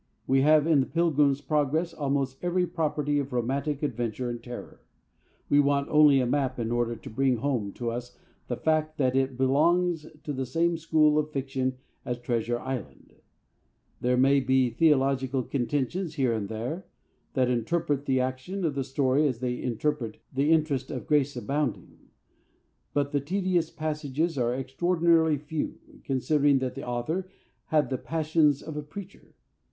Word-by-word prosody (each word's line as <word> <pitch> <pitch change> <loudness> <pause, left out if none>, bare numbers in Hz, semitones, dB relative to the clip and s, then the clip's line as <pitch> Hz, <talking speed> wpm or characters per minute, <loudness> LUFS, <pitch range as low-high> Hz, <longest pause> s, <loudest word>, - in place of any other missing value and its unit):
We 135 0 +3
have 155 +1 +5
in 160 -3 +4
The 130 - +1
Pilgrim's 150 -4 +2
Progress 150 +4 0
almost 135 -2 -2
every 180 +1 +1
property 150 -4 -1
of 140 -1 -4
romantic 135 +4 -1
adventure 120 -2 -2
and 120 -1 -6
terror. 120 0 -9 0.7
We 145 - +4
want 140 0 +2
only 150 -2 +6
a 125 - +1
map 130 0 0
in 115 -1 -2
order 120 0 0
to - - -10
bring 130 +2 +2
home 115 -5 -1
to 120 -1 -3
us 120 +1 -6 0.3
the - - -3
fact 155 0 0
that 130 -2 +1
it 135 -1 +1
belongs 160 +5 +2 0.2
to 145 - -3
the 130 -1 -3
same 170 +6 +1
school 155 -2 +3
of 150 0 -1
fiction 130 -2 -2 0.3
as 125 - -3
Treasure 120 -1 -1
Island. 120 - -6 0.9
There 125 0 +1
may 135 +2 +5
be 130 -1 +2
theological 135 -2 +2
contentions 145 +7 -2
here 130 -5 +1
and 105 -3 -3
there 125 - -4 0.5
that 130 -2 +2
interrupt 145 +3 -1
the 130 -1 +2
action 130 +9 -3
of 155 - 0
the 135 -1 -1
story 135 +2 +2
as 130 -4 -1
they 125 0 -2
interrupt 125 -1 -2 0.2
the 140 +4 +2
interest 150 -5 +1
of 130 -5 -5
Grace 145 -2 +1
Abounding. 140 -5 -3 0.9
But 140 -1 +1
the 145 -2 0
tedious 180 +1 0
passages 155 0 -2
are 120 -2 0
extraordinarily 160 +3 +2
few, 150 +2 -4 0.3
considering 140 +1 +2
that 130 -1 -2
the - - -7
author 155 +10 -2 0.4
had 150 -3 +1
the 130 - -1
passions 155 -2 +1
of 155 - -7
a 150 - -3
preacher. 190 +6 -11
140 Hz, 160 wpm, -27 LUFS, 130-155 Hz, 0.9 s, only